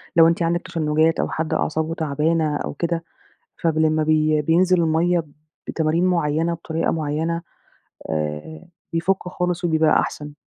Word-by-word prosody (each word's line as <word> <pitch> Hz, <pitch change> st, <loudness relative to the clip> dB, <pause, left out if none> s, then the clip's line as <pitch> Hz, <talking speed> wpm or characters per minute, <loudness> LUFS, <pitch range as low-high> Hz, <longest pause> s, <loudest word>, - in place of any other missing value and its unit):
لو 165 Hz, -1 st, +7 dB
أنتِ 170 Hz, +1 st, +1 dB
عندِك 170 Hz, +1 st, +1 dB
تشنجات 155 Hz, 0 st, +1 dB
أو -, -, 0 dB
حد 160 Hz, 0 st, -2 dB
أعصابه 160 Hz, +1 st, -1 dB
تعبانة 155 Hz, 0 st, 0 dB
أو -, -, -4 dB
كده، 170 Hz, +2 st, -2 dB, 0.6 s
فب 165 Hz, -2 st, +1 dB
لمّا 155 Hz, 0 st, +2 dB
بي 155 Hz, 0 st, +2 dB
بينزل 175 Hz, +3 st, +3 dB
الميَّة 165 Hz, +1 st, +2 dB, 0.4 s
بتمارين 160 Hz, +2 st, +1 dB
معيّنة، 165 Hz, -2 st, +1 dB
بطريقة 165 Hz, 0 st, -2 dB
معيّنة، 160 Hz, +2 st, -1 dB, 0.7 s
آآ 75 Hz, -, -4 dB, 0.3 s
بيفُكّ 180 Hz, +3 st, 0 dB
خالص 180 Hz, 0 st, -2 dB
وبيبقى 160 Hz, -2 st, +3 dB
أحسن. 150 Hz, 0 st, -4 dB
160 Hz, 140 wpm, -22 LUFS, 155-170 Hz, 0.7 s, لو